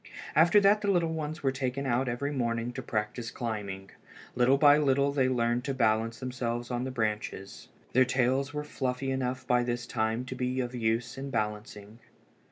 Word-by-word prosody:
After 165 +6 +6
that 205 +2 +4
the 205 - 0
little 170 -4 +2
ones 155 0 -4
were 135 - +2
taken 130 +1 -3
out 125 0 +1
every 140 +4 -2
morning 120 -3 -1
to 130 - -5
practise 115 0 -3
climbing. 100 -5 -5 0.4
Little 125 +2 +4
by 145 +1 +6
little 140 -1 +2
they 135 -2 +2
learned 120 -1 +1
to 135 -2 -2
balance 115 -1 +1
themselves 120 -1 -3
on 125 +1 -1
the - - -3
branches. 105 -4 -3 0.3
Their 130 - +6
tails 130 +2 +1
were 150 0 -3
fluffy 135 -2 -2
enough 130 -1 -2
by 125 0 +3
this 120 0 -2
time 115 +1 -1
to 130 - -6
be 125 0 -2
of 125 -1 -2
use 115 +1 -1
in 140 +1 -5
balancing. 105 -1 -4
125 Hz, 180 wpm, -29 LUFS, 115-135 Hz, 0.4 s, After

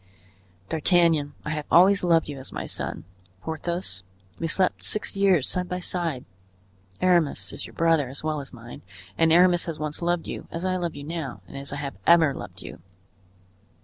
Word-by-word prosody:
D'Artagnan, 160 -3 +3
I 150 - -2
have 150 -1 -3
always 195 +3 +6
loved 170 -2 +3
you 145 -2 -6
as 130 - -9
my - - -4
son; - - -5 0.4
Porthos, 160 - -4 0.4
we 165 - -1
slept 185 +3 +1
six 215 - -1
years 190 -8 +3
side 180 0 -1
by 180 - -2
side; 170 -7 -3 0.8
Aramis 175 -5 +2
is - - -5
your - - -15
brother 165 -5 +2
as 135 - -8
well 155 -1 -1
as 140 - -10
mine, 120 -1 -11 0.3
and 165 +8 +3
Aramis 175 +1 +5
has 165 -2 -4
once 150 +2 -4
loved 175 0 0
you, - - -6
as 165 +2 -5
I 185 0 +1
love 175 -2 -2
you 145 - -7
now 155 -4 -5
and - - -12
as 140 0 -6
I - - -3
have 140 -1 -5
ever 165 -4 +6
loved 95 -8 -8
you. - - -10
165 Hz, 185 wpm, -25 LUFS, 145-175 Hz, 0.8 s, always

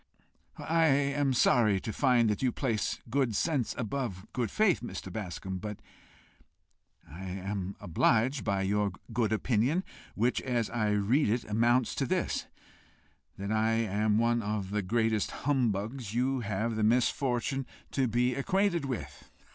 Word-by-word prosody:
"I 165 0 +2
am 140 0 +2
sorry 115 -5 +4
to 110 - -4
find 125 -4 +3
that 105 - -2
you 130 -2 +2
place 115 -5 -1
good 130 -4 +1
sense 140 -6 0
above 115 -5 -3
good 120 -3 -1
faith, 215 -5 +2
Mr. 95 -6 -7
Bascombe; 95 -2 -5
but 105 +1 -6 1.3
I 85 +6 -9
am 95 +1 -4
obliged 115 - +2
by 100 -1 0
your 100 0 0 0.2
good 110 -2 +1
opinion, 125 - +1 0.3
which, 120 +4 +1
as 120 -4 -1
I 110 -3 0
read 105 +7 +2
it, 115 +3 +1
amounts 115 +3 +2
to - - -1
this - - -1 0.9
that 100 +2 -4
I 110 +1 +2
am 110 -1 +1
one 120 +1 +2
of 100 -2 -3
the 105 0 0
greatest 110 +1 +1 0.2
humbugs 115 -3 0
you 130 +2 +1
have 110 +1 -2
the 110 - 0
misfortune 125 +3 +1 0.2
to 135 -2 +1
be 120 +2 +1
acquainted 185 +2 +1
with." 130 -3 -6
115 Hz, 145 wpm, -30 LUFS, 105-130 Hz, 1.3 s, sorry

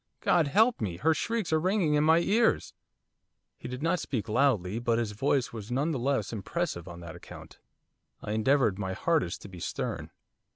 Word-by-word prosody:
God 170 -4 +3
help 220 - +3
me! 90 -6 -2
Her 160 - +3
shrieks 215 +2 -2
are 160 - +4
ringing 185 -2 +1
in 150 0 +3
my 160 +1 +5
ears!' 225 +6 +2 0.8
He - - -9
did 125 +3 -6
not 170 +2 +1
speak 120 -5 -3
loudly, 110 -5 +1
but 115 -1 +1
his 115 -3 -1
voice 135 +4 0
was 110 -2 -7
none 140 +6 0
the 140 - -2
less 125 -4 -1
impressive 110 - -3
on 85 -1 -9
that 85 0 -9
account. 85 - -12 0.6
I - - -6
endeavoured 110 -2 +2
my 95 -2 -2
hardest 155 - 0
to - - -8
be 90 -2 -11
stern. - - -4
130 Hz, 190 wpm, -29 LUFS, 105-160 Hz, 0.8 s, my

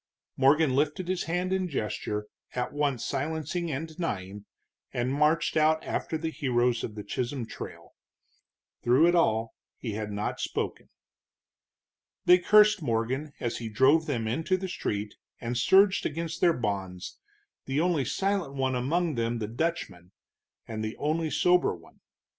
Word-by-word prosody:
Morgan 140 +1 +4
lifted 150 +6 0
his 185 -1 -1
hand 180 +3 -1
in 190 -1 0
gesture 105 -6 -3 0.3
at 125 0 -2
once 145 -5 0
silencing 160 +5 -2
and 155 +2 -3
denying, 105 - -5 0.5
and 125 +2 -1
marched 150 +3 +2
out 155 0 +3
after 160 - -2
the 160 0 -3
heroes 120 -4 +1
of 105 - -5
the 105 - -6
Chisholm 125 +3 -3
Trail. - - -9 0.9
Through 130 +7 +5
it 175 - +4
all 115 -10 +2 0.2
he 115 - -5
had 105 0 -4
not 105 +1 -3
spoken. - - -3 1.4
They 180 +1 +7
cursed 210 +1 +5
Morgan 130 +3 -1
as 120 - -2
he 115 -2 -5
drove 135 +9 +4
them 115 -2 -1
into 160 +11 0
the 190 +1 -4
street, 105 - -3 0.3
and 120 +1 -3
surged 190 - +5
against 165 +1 -3
their 170 -2 +5
bonds, 95 -5 -4 0.5
the 135 +2 -1
only 170 -4 +2
silent 195 -4 -1
one 130 -1 0
among 155 +7 0
them 115 -1 -1
the 110 -2 -3
Dutchman, 110 - -3 0.5
and 110 -1 -4
the 110 +1 -4
only 155 +2 0
sober 180 - +3
one. 85 -1 -18
140 Hz, 150 wpm, -28 LUFS, 115-165 Hz, 1.4 s, They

